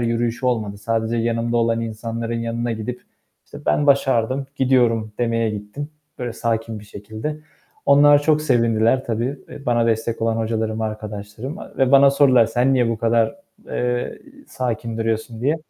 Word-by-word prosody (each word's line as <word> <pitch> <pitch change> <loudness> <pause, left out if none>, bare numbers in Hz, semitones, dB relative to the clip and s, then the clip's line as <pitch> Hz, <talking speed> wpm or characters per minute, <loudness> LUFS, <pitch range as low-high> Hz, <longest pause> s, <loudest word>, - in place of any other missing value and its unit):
yürüyüşü 120 +1 -1
olmadı. 110 -5 -1
Sadece 115 +2 -1
yanımda 115 +1 0
olan 115 0 +2
insanların 115 +1 -4
yanına 115 +1 -2
gidip, 115 +3 -5 0.4
işte, - - -11
"Ben 145 - +2
başardım, 135 -1 +2
gidiyorum." 120 -5 +2
demeye 115 -2 +1
gittim. 105 +8 -6 0.3
Böyle 120 -2 -3
sakin 115 -1 -2
bir - - -13
şekilde. 110 +9 -6 0.5
Onlar 145 +1 +6
çok 155 0 +3
sevindiler 115 -1 +2
tabii, 120 +5 -2
eee, 140 - -11
bana 120 -1 +2
destek 115 0 -1
olan 115 0 +1
hocalarım, 110 -1 -1
arkadaşlarım. 110 - -5
Eee 210 - -11
ve 135 0 +3
bana 140 0 +7
sordular: 130 -4 +5
"Sen 125 +4 +2
niye 125 -2 +2
bu 115 - -1
kadar, 115 0 +2 0.3
eee, 125 0 -2 0.3
sakin 115 -2 -3
duruyorsun?" 110 0 -2
diye. 145 +6 +1
115 Hz, 155 wpm, -21 LUFS, 110-125 Hz, 0.5 s, bana